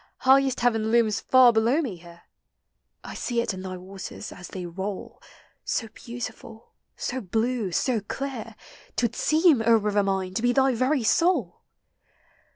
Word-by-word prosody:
highest 265 -1 +4
heaven 225 -2 +1
looms 225 -3 +3
far 255 -2 +5
below 230 +6 +2
me 245 - -3
here; 170 0 -15 0.4
* - - -54 0.3
I - - -8
see 240 -2 -2
it 235 - -1
in 185 - -7
thy 185 -1 -6
waters, 185 +1 -8
as 180 - -10
they 185 -2 -7
roll, 190 +3 -6 0.4
80 225 - -2
beautiful, 230 -1 -9 0.2
so 260 +1 -4
blue, 220 +1 -1
so 240 +6 +1
clear, 230 0 -6 0.4
'T - - -1
would 235 - -2
seem, 310 -5 +3
O 230 0 +5
river 210 -1 +1
mine, 190 -2 -1
to 205 - -2
be 245 +1 +2
thy 265 0 +3
very 255 +3 +1
soul 270 - +1
225 Hz, 160 wpm, -25 LUFS, 195-255 Hz, 0.4 s, far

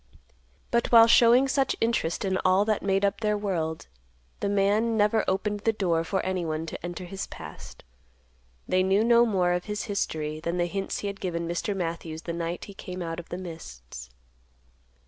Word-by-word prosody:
But 235 0 +1
while 230 -1 +9
showing 240 +3 +6
such 270 0 +1
interest 225 -6 0
in 190 -1 0
all 185 +2 +4
that 215 -1 0
made 195 0 +1
up 200 +2 -1
their 210 -1 +1
world, 170 -6 -2 0.5
the 200 - -1
man 205 +3 +2
never 210 +1 +3
opened 205 +2 0
the 225 +2 +1
door 175 -6 0
for 190 +3 -1
anyone 165 -4 -2
to 160 - -7
enter 175 +1 -5
his 190 +2 -5
past. - - -11 0.8
They 185 - +2
knew 190 +3 +3
no 235 +1 +5
more 185 -5 +2
of 180 0 -2
his 210 -1 -3
history 155 -8 -2
than 170 +2 -3
the 175 - +2
hints 195 +2 -3
he 205 - -3
had 200 0 -5
given 170 -2 -2
Mr. 175 +4 -2
Matthews 165 -2 -4
the 170 - -4
night 170 +1 -4
he 200 - -11
came 180 -1 -7
out 165 0 -4
of 170 - -10
the 175 - -4
mists. 65 - -9
190 Hz, 185 wpm, -27 LUFS, 170-210 Hz, 0.8 s, while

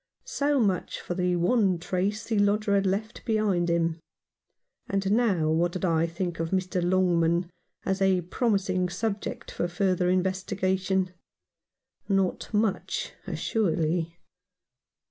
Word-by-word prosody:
So 285 0 +1
much 195 -6 0
for - - -4
the 180 0 +1
one 185 +1 +2
trace 195 +5 -1
the 220 -3 0
lodger 205 0 +2
had 195 -1 +3
left 210 +4 -2
behind 205 -6 +1
him. 165 -1 +1 0.9
And 195 0 0
now 200 -9 +2
what 170 +2 +1
did 185 - -2
I 165 -1 +2
think 175 0 -4
of 165 0 -1
Mr. 185 0 0
Longman 175 -1 +2 0.3
as 190 0 -1
a 190 -2 +3
promising 185 -1 0
subject 210 +2 -3
for 175 - -1
further 180 0 +1
in 185 0 +3
vestigation? 190 0 -1 1.0
Not 195 -2 0
much, 220 - -1
assuredly. 170 -5 0
185 Hz, 125 wpm, -27 LUFS, 175-200 Hz, 1.0 s, had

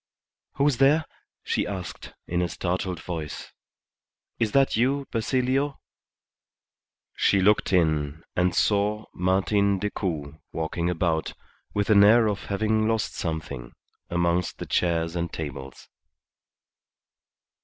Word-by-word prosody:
"Who's 140 -2 +2
there?" 145 +4 +4 0.4
she - - -1
asked, 95 -3 -6
in 85 +1 -1
a 90 - 0
startled 90 0 -2
voice. 80 -3 -6 0.9
"Is 110 -2 +1
that 135 -1 +4
you, 135 +5 +1
Basilio?" 130 +4 0 1.4
She 100 - +3
looked 105 +2 +3
in, 80 -3 +1
and 90 0 +2
saw 105 +1 +1
Martin 100 +2 +2
Decoud 80 -7 -3
walking 85 +2 -2
about, 80 -2 -1 0.4
with 105 +1 +1
an 100 -1 +7
air 115 +3 +6
of 105 -1 -2
having 110 +2 +1
lost 115 -1 0
something, 80 -7 -5 0.4
amongst 85 0 0
the - - -6
chairs 85 -1 0
and 85 -1 -2
tables. 65 -4 -7
95 Hz, 110 wpm, -26 LUFS, 85-110 Hz, 1.4 s, an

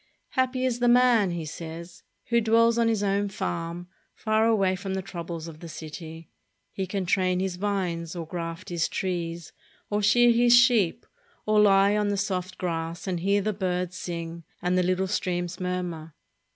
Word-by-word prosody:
"Happy 260 0 0
is 245 -2 0
the 245 - +2
man," 240 -4 +5
he 170 -2 -4
says, 165 +2 -8 0.3
"who 235 0 +3
dwells 230 +1 +3
on 230 - +3
his 220 -3 +1
own 200 0 +1
farm, 170 -2 -4 0.3
far 220 +1 +1
away 195 -4 +2
from 190 +1 -4
the 190 - -2
troubles 170 -2 -6
of 160 -2 -10
the 170 - -9
city. 160 +1 -9 0.4
He 190 -1 -4
can 190 0 -2
train 185 0 +1
his 185 -1 -2
vines, 180 -4 -2
or 170 -2 -4
graft 165 +1 -6
his 170 -3 0
trees, 170 -3 -3 0.4
or 210 0 +1
shear 240 +4 +5
his 240 +1 +6
sheep, 240 -8 +3 0.4
or 215 0 +3
lie 200 0 +5
on 210 -1 +1
the 205 0 0
soft 185 -2 -2
grass 165 -1 -3
and 185 -3 -2
hear 200 +3 +1
the 215 +1 0
birds 180 -2 -2
sing 170 -2 -6 0.2
and 180 +1 0
the 185 - +3
little 185 +1 +1
streams 175 -3 -2
murmur." 180 -4 -4
185 Hz, 180 wpm, -26 LUFS, 170-210 Hz, 0.4 s, his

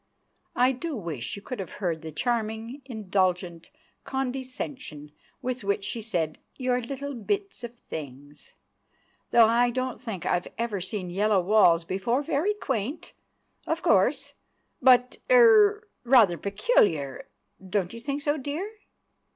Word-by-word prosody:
I 250 +1 +4
do 295 +4 -4
wish 165 - -4
you 200 - -10
could 255 - -6
have 185 -4 -6
heard 170 -5 -2
the 160 -1 -7
charming, 230 - -2
indulgent 185 -7 -1 0.3
condescension 255 - -5 0.3
with 255 -2 -3
which 200 0 0
she 230 +3 -3
said 170 -8 -2 0.2
"your 255 -1 0
little 275 +3 -5
bits 390 - -3
of 240 0 -7
things"! 145 - -9 0.8
"Though 235 -1 +7
I 235 +2 +3
don't 255 +1 -3
think 205 -7 -6
I've 175 0 0
ever 225 -4 -2
seen 185 -1 -4
yellow 205 +2 +2
walls 180 -3 +4
before—very 275 - 0
quaint, 270 - -3 0.5
of - - -1
course, - - +2 0.5
but—er—rather 340 - +5
peculiar. 195 - +1 0.4
Don't 190 0 -2
you 230 - -7
think 280 +4 -4
so, 295 -1 +1
dear?" 300 +9 -4
230 Hz, 125 wpm, -26 LUFS, 185-265 Hz, 0.8 s, Though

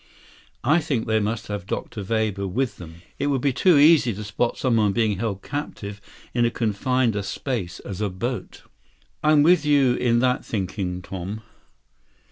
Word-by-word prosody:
I 155 +4 +4
think 135 -8 -1
they 110 0 +2
must 105 0 -2
have 105 -3 -5
Dr. 105 +1 -4
Weber 105 -2 -1
with 125 +7 -2
them. 85 0 -11 0.2
It 140 - 0
would 140 -2 +1
be 140 -1 +1
too 175 +4 +4
easy 145 - +5
to 105 - -6
spot 105 +4 -1
someone 110 -6 +2
being 110 -4 +1
held 100 -4 -3
captive 105 -8 -5 0.3
in 120 - +2
as 120 - +1
confined 120 +2 0
a 105 - -1
space 100 -3 -4
as 100 0 -6
a 105 - 0
boat." 110 +3 -5 0.6
"I'm 150 -1 +5
with 170 0 +5
you 140 -4 +4
in 120 -1 +2
that 125 +1 +1
thinking, 95 -3 -3
Tom." 95 +4 -6
110 Hz, 170 wpm, -24 LUFS, 100-130 Hz, 0.6 s, easy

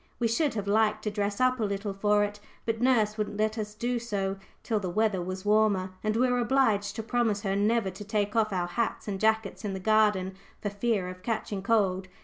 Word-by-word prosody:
We 235 - +1
should 265 +4 +1
have 205 -2 -2
liked 215 +1 +2
to 210 - -1
dress 205 -1 -2
up 255 0 +3
a - - 0
little 200 0 -2
for 205 +1 +2
it, 205 0 -3 0.3
but 225 0 -1
nurse 220 -4 +2
wouldn't 210 -1 -2
let 215 0 +1
us 210 0 -5
do 240 +2 -1
so 195 -4 -2 0.3
till 220 -3 0
the 190 -3 -3
weather 210 0 +1
was 185 +2 -5
warmer, 205 -3 +3
and 215 0 0
we 250 +3 +3
were 250 0 +1
obliged 230 -5 +2
to 225 - -4
promise 225 -3 0
her 195 -1 0
never 210 0 +1
to 195 +3 -9
take 205 0 -1
off 220 -1 +2
our 180 -2 0
hats 220 +7 -2
and 195 -2 -3
jackets 220 -1 +1
in 205 -2 -2
the 190 - -4
garden 210 -2 +2 0.3
for 205 - -3
fear 205 -2 0
of 185 0 -8
catching 210 -2 -3
cold. 195 -3 +1
210 Hz, 225 wpm, -28 LUFS, 200-225 Hz, 0.3 s, up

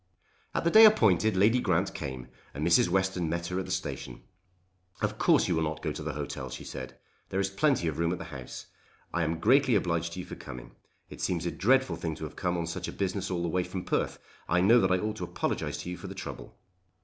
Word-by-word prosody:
At - - 0
the 170 - +2
day 220 +4 +9
appointed 110 - +4
Lady 110 +6 +4
Grant 95 -4 +1
came 65 -4 -6 0.3
and 75 +3 -2
Mrs. 85 +9 +4
Western 95 -3 0
met 85 +1 -2
her 90 +1 -1
at 95 - -3
the - - -5
station. 70 -9 -4 0.8
"Of - - -2
course - - +4
you 85 - +1
will 80 - +1
not 80 0 -3
go - - -1
to - - -6
the - - -3
hotel," 65 -1 -5
she 65 - -7
said; 65 -1 -8 0.3
"there 95 - -1
is 95 -1 0
plenty 135 - +2
of 80 0 -2
room 85 0 +1
at 90 - -2
the - - -7
house. 65 -2 -8 0.5
I 85 - 0
am 80 +1 -1
greatly 130 - +4
obliged 85 -3 0
to 90 - -6
you - - -9
for - - -9
coming. 60 - -9 0.4
It - - -9
seems 85 -1 -1
a 85 - 0
dreadful 130 -5 +2
thing 80 -2 -3
to 80 - -9
have 75 -1 -6
to - - -11
come 90 -1 0
on 85 - -1
such 85 - -4
a - - -4
business 95 0 -2
all 90 -2 -1
the - - 0
way 90 +2 +1
from 90 0 -6
Perth. - - -1 0.3
I 85 - +3
know 110 +7 +6
that 95 - +2
I 95 - +4
ought 105 +3 -3
to - - -5
apologise - - -2
to 90 - -5
you 90 - -5
for 95 - -8
the 95 - -8
trouble." - - -8
90 Hz, 255 wpm, -29 LUFS, 80-100 Hz, 0.8 s, day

